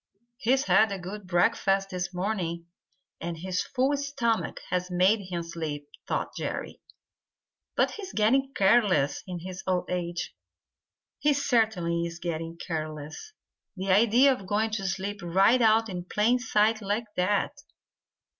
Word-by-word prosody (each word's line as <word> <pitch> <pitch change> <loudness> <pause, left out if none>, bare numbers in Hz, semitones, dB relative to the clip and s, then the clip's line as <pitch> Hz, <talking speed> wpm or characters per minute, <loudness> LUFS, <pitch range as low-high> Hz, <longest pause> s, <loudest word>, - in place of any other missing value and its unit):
"He's 265 +4 +2
had 220 -7 +4
a 195 - -2
good 190 +2 -8
breakfast 195 +2 +2
this 180 0 -3
morning, 180 -3 -2 0.5
and 170 -1 -4
his 180 +2 -2
full 270 +2 0
stomach 275 -5 -1
has 180 0 0
made 185 +5 +3
him 170 -2 -3
sleepy," 155 -3 -5 0.2
thought - - -2
Jerry. - - -5 0.9
"But - - +2
he's 390 -3 -7
getting 265 +6 +2
careless 195 -8 +3
in 180 -2 -5
his 185 +1 -7
old 180 -1 0
age. 175 -1 -3 0.9
He 295 0 +3
certainly 215 -11 +1
is 170 0 -8
getting 165 -1 -4
careless. 155 - -6 0.4
The 190 +1 -1
idea 235 +7 +5
of 195 -7 -8
going 215 +3 +1
to 200 -3 -2
sleep 195 +1 -3
right 195 +8 +4
out 225 0 +4
in 180 -3 -5
plain 220 +6 +2
sight 220 -2 +2
like 205 +3 -1
that!" 205 +9 0
195 Hz, 140 wpm, -27 LUFS, 175-225 Hz, 0.9 s, idea